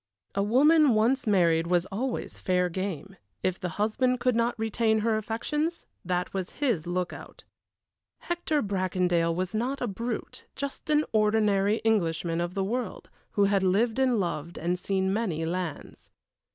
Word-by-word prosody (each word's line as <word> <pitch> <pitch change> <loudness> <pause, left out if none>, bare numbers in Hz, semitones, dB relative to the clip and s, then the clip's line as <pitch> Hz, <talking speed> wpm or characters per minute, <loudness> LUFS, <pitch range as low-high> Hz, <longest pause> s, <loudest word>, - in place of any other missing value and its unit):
A 200 - 0
woman 280 +5 +5
once 230 +4 +2
married 170 -5 +3
was 175 0 +2
always 245 +6 -3
fair 180 -1 +1
game; 190 0 -5 0.3
if 185 -1 0
the 180 - -3
husband 250 +4 +1
could 250 -1 +2
not 235 +1 +1
retain 220 0 +1
her 225 0 +2
affections 295 +10 -2 0.2
that 180 0 -2
was 190 -2 -4
his 230 - 0
lookout. 180 0 -4 0.8
Hector 340 -4 -1
Bracondale 180 -4 +1
was 180 0 -2
not 250 +5 -1
a - - -1
brute, 230 +2 -5
just 280 +2 -6
an 300 0 +3
ordinary 210 -2 +3
Englishman 170 -6 +1
of 175 +1 -3
the 195 - 0
world, 240 +5 -4 0.2
who 205 - +3
had 200 -1 +3
lived 215 +6 +2
and 255 -4 +3
loved 170 -3 -3
and 175 +1 -1
seen 190 0 0
many 185 -8 -1
lands. 175 -2 -5
205 Hz, 150 wpm, -27 LUFS, 180-235 Hz, 0.8 s, woman